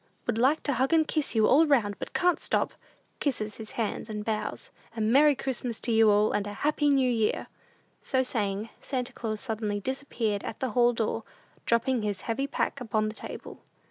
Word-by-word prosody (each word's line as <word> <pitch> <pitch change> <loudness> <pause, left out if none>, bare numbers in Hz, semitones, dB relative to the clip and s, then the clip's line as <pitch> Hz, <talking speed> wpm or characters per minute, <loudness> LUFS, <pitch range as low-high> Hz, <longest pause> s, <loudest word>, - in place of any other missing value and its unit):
Would 235 -2 -1
like 270 +6 +3
to 285 - +1
hug 260 +4 +1
and 315 -1 +4
kiss 305 -6 0
you 220 -1 +5
all 310 +7 +5
round, 210 -9 +2
but - - -6
can't 360 -1 +2
stop. - - 0 0.5
(Kisses 215 -7 -2
his 220 -1 -8
hand 220 -1 -3
and 210 -1 -4
bows.) 215 -1 -3 0.3
A - - -2
Merry 275 +7 +5
Christmas 250 -3 -3
to 235 - 0
you 225 -1 +5
all, 210 +1 +4
and 205 0 -1
a 205 - -5
Happy 295 -1 +2
New 270 -2 +4
Year." 225 -3 +1 0.6
So 260 -2 +1
saying, 210 -3 -2
Santa 250 -3 -3
Claus 215 -2 -4
suddenly 215 -4 -2
disappeared 230 -4 -2
at 220 - -6
the 260 -3 -1
hall 240 +2 +4
door, 225 0 -1 0.5
dropping 235 +1 +2
his 205 -3 -2
heavy 260 +4 -2
pack 280 -1 -2
upon 215 -2 0
the - - -6
table. - - -8
230 Hz, 195 wpm, -28 LUFS, 215-265 Hz, 0.6 s, you